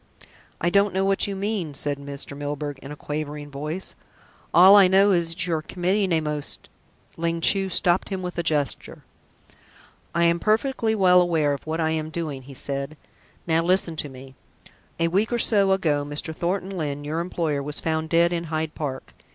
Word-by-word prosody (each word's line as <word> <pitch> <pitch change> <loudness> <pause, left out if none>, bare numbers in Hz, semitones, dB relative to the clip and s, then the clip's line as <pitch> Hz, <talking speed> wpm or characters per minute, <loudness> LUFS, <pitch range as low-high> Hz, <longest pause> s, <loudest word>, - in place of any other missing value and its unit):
"I 175 - 0
don't 200 0 +3
know 190 0 +1
what 195 +1 +2
you 200 - -3
mean," 195 -6 -3
said 145 0 -2
Mr. 140 0 -6
Milburgh 145 0 -4
in 140 - -10
a - - -6
quavering 150 0 -5
voice. 150 +6 -4 0.6
"All 185 +3 +8
I 200 -2 +8
know 195 +2 +5
is 170 -3 +2
that 165 +2 -1
you 175 - -1
are 160 - 0
committing 185 +4 -1
a 160 -1 +2
most 150 -1 -5 0.2
" - - -35
Ling 165 0 -1
Chu 195 +3 +2
stopped 180 0 +1
him 190 -2 -4
with 180 0 -5
a - - +3
gesture. 150 -4 -2 1.1
"I 170 - +3
am 170 0 +3
perfectly 220 +2 +1
well 180 -3 +5
aware 160 -5 +1
of 140 - -7
what 160 +1 -2
I 160 -1 +1
am 155 -1 -2
doing," 155 -4 -4
he 135 +1 -12
said. 140 +3 -4 0.5
"Now 165 -1 +2
listen 180 -1 +2
to 150 - 0
me. 130 0 -12 0.7
A 165 - +2
week 195 +7 +1
or 240 - +1
so 200 -4 +3
ago, 155 -7 +1
Mr. 145 +2 -3
Thornton 185 +3 -2
Lyne, 145 -4 -3
your 155 +3 -3
employer, 165 -4 -2
was 145 +1 -3
found 160 0 -2
dead 170 +1 +3
in 170 0 -2
Hyde 155 -1 -3
Park. 135 -4 -5
165 Hz, 195 wpm, -24 LUFS, 150-185 Hz, 1.1 s, All